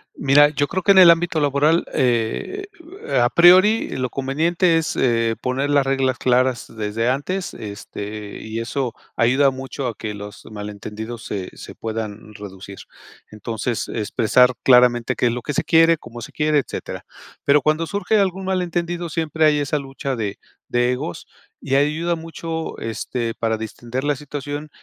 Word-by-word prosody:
Mira, 145 Hz, +1 st, +5 dB
yo 145 Hz, -1 st, -1 dB
creo 185 Hz, +2 st, -3 dB
que 200 Hz, -, +5 dB
en 195 Hz, -, +5 dB
el 180 Hz, -2 st, +9 dB
ámbito 170 Hz, -1 st, +3 dB
laboral, 145 Hz, +3 st, +2 dB
eh, 125 Hz, -, 0 dB, 0.6 s
a 120 Hz, -, +4 dB
priori, 185 Hz, -, +5 dB
lo 130 Hz, -1 st, -1 dB
conveniente 165 Hz, +7 st, +1 dB
es, 165 Hz, -1 st, -1 dB
eh, 115 Hz, -2 st, +2 dB
poner 135 Hz, +3 st, -1 dB
las 140 Hz, -2 st, +3 dB
reglas 135 Hz, -1 st, +1 dB
claras 125 Hz, -1 st, +1 dB
desde 110 Hz, +2 st, -1 dB
antes, 180 Hz, +8 st, -2 dB
este, 105 Hz, 0 st, -7 dB
y 110 Hz, +1 st, -5 dB
eso 120 Hz, +1 st, -2 dB, 0.2 s
ayuda 130 Hz, +4 st, +3 dB
mucho 135 Hz, 0 st, -5 dB
a 115 Hz, -, -4 dB
que 110 Hz, -2 st, -5 dB
los 105 Hz, 0 st, -9 dB
malentendidos 105 Hz, +2 st, -7 dB
se 95 Hz, -3 st, -5 dB
se -, -, -10 dB
puedan 110 Hz, -1 st, -6 dB
reducir. 100 Hz, -1 st, -10 dB, 0.5 s
Entonces, 110 Hz, +2 st, -3 dB
expresar 115 Hz, +3 st, +2 dB
claramente 125 Hz, -2 st, +4 dB
qué 125 Hz, -, +1 dB
es -, -, +1 dB
lo 120 Hz, +1 st, -4 dB
que 145 Hz, -, -4 dB
se -, -, 0 dB
quiere, 165 Hz, 0 st, +5 dB
cómo 120 Hz, -4 st, -11 dB
se -, -, -9 dB
quiere, 150 Hz, -1 st, +2 dB
etcétera. -, -, -6 dB, 0.4 s
Pero 145 Hz, 0 st, +5 dB
cuando 155 Hz, +3 st, +1 dB
surge 200 Hz, +1 st, 0 dB
algún 190 Hz, -1 st, 0 dB
mal 190 Hz, -1 st, 0 dB
entendido, 175 Hz, 0 st, -2 dB
siempre 160 Hz, 0 st, 0 dB
hay 150 Hz, -1 st, +4 dB
esa 145 Hz, +1 st, -1 dB
lucha 135 Hz, 0 st, -4 dB
de 105 Hz, -3 st, -4 dB, 0.3 s
de 120 Hz, +1 st, +1 dB
egos 125 Hz, -8 st, -6 dB, 0.3 s
y 135 Hz, -, -1 dB
ayuda 155 Hz, +5 st, +1 dB
mucho, 165 Hz, 0 st, -6 dB
este, 115 Hz, +1 st, -3 dB
para 110 Hz, -1 st, -1 dB
distender 120 Hz, +4 st, -5 dB
la 145 Hz, 0 st, +1 dB
situación, 145 Hz, +2 st, -6 dB
135 Hz, 165 wpm, -21 LUFS, 115-160 Hz, 0.6 s, el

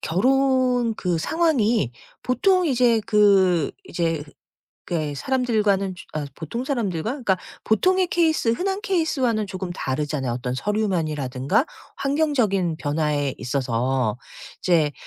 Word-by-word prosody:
결혼 255 Hz, +3 st, +2 dB
그 180 Hz, -5 st, -1 dB
상황이 235 Hz, -, +1 dB, 0.3 s
보통 365 Hz, +9 st, +2 dB
이제 245 Hz, -5 st, +3 dB
그 195 Hz, -6 st, +4 dB
이제 165 Hz, -, -2 dB, 0.6 s
그게 155 Hz, -4 st, -2 dB
사람들과는 210 Hz, -, 0 dB
즈 175 Hz, -, -12 dB
어 150 Hz, -, -3 dB
보통 205 Hz, -, -5 dB
사람들과 220 Hz, -, -1 dB
그러니까 240 Hz, -9 st, 0 dB, 0.3 s
보통의 370 Hz, -, +2 dB
케이스, 320 Hz, -8 st, +1 dB
흔한 385 Hz, -, 0 dB
케이스와는 270 Hz, -, 0 dB
조금 185 Hz, -1 st, -5 dB
다르잖아요 135 Hz, -3 st, -2 dB
어떤 125 Hz, +1 st, -3 dB
서류 210 Hz, +9 st, -1 dB
면이라든가 155 Hz, -, 0 dB, 0.3 s
환경적인 255 Hz, -, +1 dB
변화에 145 Hz, -2 st, -1 dB
있어서. 125 Hz, -2 st, -1 dB, 0.4 s
이제 160 Hz, -5 st, +2 dB
200 Hz, 290 characters per minute, -23 LUFS, 155-255 Hz, 0.6 s, 그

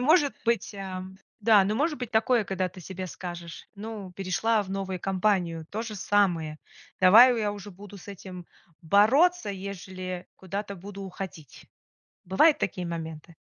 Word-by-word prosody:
может 290 Hz, +2 st, +4 dB
быть, 230 Hz, -2 st, 0 dB
ам, 190 Hz, -1 st, -6 dB, 0.2 s
да, 210 Hz, -2 st, +6 dB
ну, 210 Hz, +3 st, 0 dB
может 300 Hz, +2 st, 0 dB
быть 245 Hz, -2 st, -5 dB
такое, 225 Hz, 0 st, +3 dB
когда 190 Hz, -1 st, -1 dB
ты 185 Hz, +1 st, -13 dB
себе 185 Hz, +1 st, -6 dB
скажешь: 175 Hz, -2 st, -8 dB
"Ну, 205 Hz, -3 st, -7 dB
перешла 200 Hz, +4 st, +1 dB
в 190 Hz, -, -10 dB
новую 190 Hz, -2 st, -3 dB
компанию- 185 Hz, -4 st, 0 dB
то 220 Hz, +2 st, -3 dB
же 220 Hz, -2 st, -6 dB
самое. 175 Hz, -7 st, +1 dB, 0.4 s
Давай 230 Hz, +7 st, +8 dB
я 210 Hz, -2 st, 0 dB
уже 205 Hz, 0 st, -9 dB
буду 200 Hz, +2 st, -12 dB
с 200 Hz, -, -14 dB
этим 185 Hz, -2 st, -9 dB, 0.4 s
бороться, 245 Hz, -, +4 dB
ежели 185 Hz, -2 st, -6 dB
куда-то 200 Hz, +2 st, -5 dB
буду 200 Hz, +2 st, -9 dB
уходить". 185 Hz, -, -8 dB, 0.6 s
Бывают 290 Hz, -, +4 dB
такие 180 Hz, -1 st, -2 dB
моменты? 165 Hz, -1 st, -6 dB
195 Hz, 150 wpm, -27 LUFS, 180-215 Hz, 0.6 s, Давай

